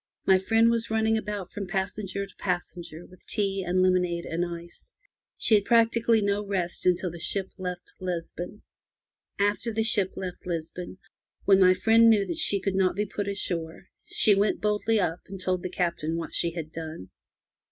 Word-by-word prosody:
My 190 -1 +5
friend 225 +4 +3
was 230 0 -1
running 220 0 +2
about 205 -4 -4
from 200 -2 -5
passenger 195 +1 -3
to 195 - -19
passenger 175 -2 -4
with 185 - -17
tea 195 -2 0
and 185 +1 +1
lemonade 180 -2 +1
and 170 +2 -2
ice. 170 - -8 0.5
She - - +3
had 205 -2 +5
practically 230 -1 +3
no 200 +1 0
rest 185 -3 -1
until 180 0 +2
the 170 - -9
ship 190 +3 -1
left 180 -1 -6
Lisbon. 180 +2 -5 0.7
After 205 +3 0
the 225 0 0
ship 205 -4 +2
left 180 -1 -6
Lisbon, 175 +2 -5 0.5
when 195 -1 +6
my 185 -1 +6
friend 225 +4 +5
knew 210 -3 +4
that 330 - -4
she 205 -10 +4
could 195 0 -2
not 190 -1 +2
be 210 +2 0
put 205 0 -4
ashore, 175 -3 -3 0.2
she 210 - +4
went 200 +1 +1
boldly 210 +1 +1
up 175 -2 -1
and 195 0 -8
told 185 0 -1
the 185 - -4
Captain 170 -3 -2
what 165 - -5
she 170 - +1
had 165 -2 -6
done. 160 - -8
190 Hz, 180 wpm, -27 LUFS, 175-210 Hz, 0.7 s, when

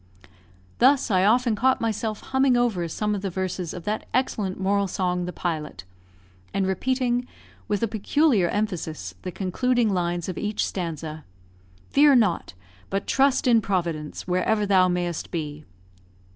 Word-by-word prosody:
Thus, 260 -1 +4
I 185 -1 +3
often 235 +1 +3
caught 260 +5 +2
myself 220 -1 -2
humming 265 -1 +2
over 215 -8 +1
some 210 +6 -2
of 200 - -3
the 195 - -2
verses 185 -2 -3
of 175 - -7
that 210 +3 -3
excellent 210 -7 -1
moral 200 +1 +1
song 180 -1 -1
"The 180 - -4
Pilot," 155 - -4 0.7
and 195 -1 +1
repeating, 250 +5 0 0.4
with 205 +1 -1
a - - +3
peculiar 220 - +2
emphasis, 165 - -3
the 180 - -5
concluding 225 +4 0
lines 175 -1 -1
of 185 - -4
each 210 0 -1
stanza, 160 -3 -5 0.7
"Fear 285 0 +6
not! 205 - +1 0.3
but 195 +1 -2
trust 275 0 +2
in 235 -3 +5
Providence, 170 -7 -3
Wherever 195 +4 +1
thou 190 -2 +4
may'st 175 -2 -2
be." 150 -3 -5
195 Hz, 145 wpm, -25 LUFS, 175-230 Hz, 0.7 s, Fear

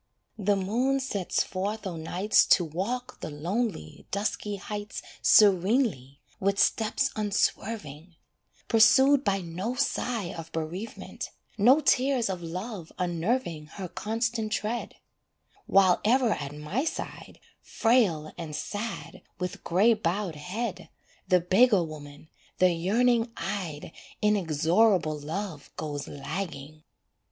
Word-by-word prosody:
The 205 0 +2
moon 240 +8 +1
sets 205 -9 -1
forth 205 +3 -4
o' 185 -3 -3
nights 180 +6 +2
To 175 - +5
walk 200 +11 -4
the - - -5
lonely, 170 - -3
dusky 205 0 -2
heights 205 +1 -6 0.2
Serenely, 190 - +4 0.2
with 200 +1 +1
steps 225 +8 +2
unswerving; 195 -6 -2 0.5
Pursued 265 +5 +6
by 195 -4 +1
no 185 +8 -4
sigh 245 -7 -1
of 165 -1 -8
bereavement, 165 +8 -5 0.3
No 250 +9 +5
tears 260 -6 +2
of 180 -2 -5
love 180 +2 -6
unnerving 175 -1 -1
Her 190 -2 -5
constant 225 +3 -2
tread: 220 +2 -2 0.7
While 190 -2 +4
ever 240 +1 +3
at 145 -3 -3
my 150 - -2
side, 325 - -6 0.2
Frail 210 -11 +1
and 155 -3 -5
sad, 205 +1 -5 0.2
with 180 -1 -5
grey 200 +7 +4
bowed 195 -3 -2
head, 185 +11 -5 0.4
The 180 -2 +4
beggar 195 +2 +4
woman, 150 -1 -10 0.3
the 185 -1 +5
yearning 230 +7 +2
eyed 165 -7 -4 0.3
Inexorable 180 -3 +2
love 160 +1 -5
goes 145 -2 -4
lagging. 155 -1 -6
195 Hz, 115 wpm, -27 LUFS, 165-225 Hz, 0.7 s, Pursued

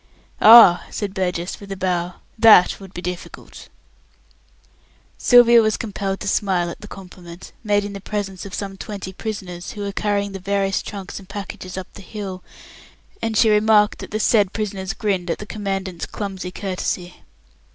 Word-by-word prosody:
"Ah!" 215 -6 +9
said 200 -3 -4
Burgess, 180 -2 -3
with 200 -1 -11
a 195 - -4
bow, 180 -1 -1 0.2
"that 220 -5 +6
would 195 -2 -12
be 175 -1 -8
difficult." 180 0 -8 1.5
Sylvia 240 -1 +7
was 215 -1 +1
compelled 195 -3 -4
to - - -5
smile 185 -4 0
at - - -11
the 210 - -9
compliment, 180 -3 -12
made 205 -1 +1
in 205 - -6
the 200 - -8
presence 195 -2 -4
of 200 - -7
some 195 -1 -5
twenty 195 -2 -7
prisoners, 190 -4 -6
who 205 - -7
were 200 0 -3
carrying 200 0 -1
the 195 - -7
various 195 0 0
trunks 200 -1 -7
and 195 -1 -16
packages 195 -2 -7
up 190 - -7
the - - -11
hill, 195 -2 -7 0.8
and 220 -1 -1
she 220 0 +5
remarked 210 0 +4
that - - -8
the 215 - -3
said 210 -3 +3
prisoners 200 -2 -3
grinned 190 -5 -2
at 165 - -1
the 210 - -8
Commandant's 195 -4 -4
clumsy 190 -3 -5
courtesy. 180 -2 -4
195 Hz, 170 wpm, -21 LUFS, 185-210 Hz, 1.5 s, Ah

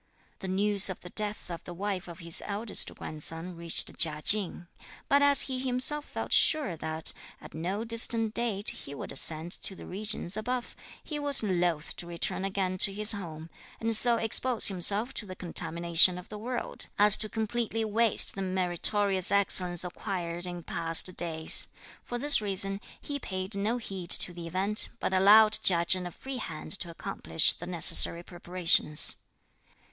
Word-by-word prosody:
The 190 - -8
news 200 +1 +4
of 185 - -8
the 180 - -13
death 210 -3 -4
of 170 - -8
the 175 - -11
wife 195 0 -5
of 170 - -11
his 170 -2 -2
eldest 205 +1 -2
grandson 165 +3 -3
reached 170 0 -2
Chia 155 -2 +1
Ching; 200 -4 +3 0.4
but 280 0 +2
as 285 -1 +5
he 260 -1 -5
himself 260 +3 +1
felt - - -6
sure 300 - +2
that, 160 0 -4 0.3
at - - -15
no 185 +7 -5
distant 230 -1 +1
date, 225 -4 0
he 140 - -11
would - - -7
ascend 160 +4 +3
to 190 - -2
the - - -13
regions 195 -2 -2
above, 245 +3 -5 0.3
he 300 -2 -7
was 285 -4 +4
loth 175 -5 -2
to 175 - -7
return 170 +2 -4
again 190 -1 -4
to 195 - +5
his 210 +2 +5
home, 165 -6 -6 0.3
and 225 0 -1
so 235 +1 +3
expose 230 +1 +2
himself 200 +7 +1
to 210 - -5
the 185 - -9
contamination 170 0 +1
of 180 - -12
the 210 - -9
world, 245 +3 -6
as 210 0 +7
to 215 - -2
completely 225 0 -4
waste 220 +1 0
the 195 - -7
meritorious 190 +1 0
excellence 185 -3 +3
acquired 175 -1 -6
in 175 -1 -8
past 165 +3 0
days. 160 -2 +2 0.4
For 245 - -6
this 290 -1 +4
reason, 195 -1 0 0.2
he 285 -1 -6
paid 190 -3 -6
no 210 +5 -2
heed 190 -7 -9
to 180 - 0
the 170 -1 -9
event, 195 +5 -2
but - - -4
allowed 210 +3 +5
Chia 170 -2 +2
Chen 180 +1 -1
a - - -10
free 265 +8 -9
hand - - -8
to 175 - -5
accomplish 165 -1 +1
the 175 - -11
necessary 170 -1 +3
preparations. 175 -3 +3
195 Hz, 170 wpm, -27 LUFS, 175-220 Hz, 0.4 s, as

